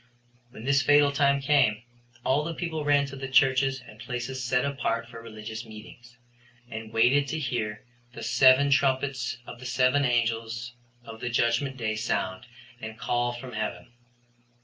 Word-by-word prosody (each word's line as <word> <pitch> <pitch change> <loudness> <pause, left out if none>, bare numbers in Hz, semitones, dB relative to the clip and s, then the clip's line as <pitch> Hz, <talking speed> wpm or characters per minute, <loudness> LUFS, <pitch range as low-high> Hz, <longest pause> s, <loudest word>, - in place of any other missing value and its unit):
When 110 - -11
this 140 +1 +3
fatal 145 +2 +5
time 140 -1 +2
came, 130 -6 +2 0.4
all 140 +3 +2
the 165 +1 -4
people 160 -3 -3
ran 145 -1 +3
to 140 0 -8
the 135 0 -5
churches 135 0 +3
and 110 0 -14
places 125 +2 -4
set 125 +1 +1
apart 115 -4 -2
for 115 -1 -10
religious 110 0 -7
meetings, 115 +2 -13 0.5
and 110 0 -7
waited 125 +5 +3
to 160 - -3
hear 115 -7 -3 0.3
the 115 - -8
seven 130 +4 +5
trumpets 130 -2 +1
of 120 - -10
the 130 - -10
seven 130 +3 +2
angels 120 0 -1 0.3
of 115 -1 -10
the 125 - -2
judgment 120 +3 +1
day 110 -3 -2
sound 95 -1 -2 0.3
and 110 0 -7
call 120 0 -1
from 125 +1 -9
heaven. 110 +2 -4
125 Hz, 160 wpm, -27 LUFS, 115-135 Hz, 0.5 s, fatal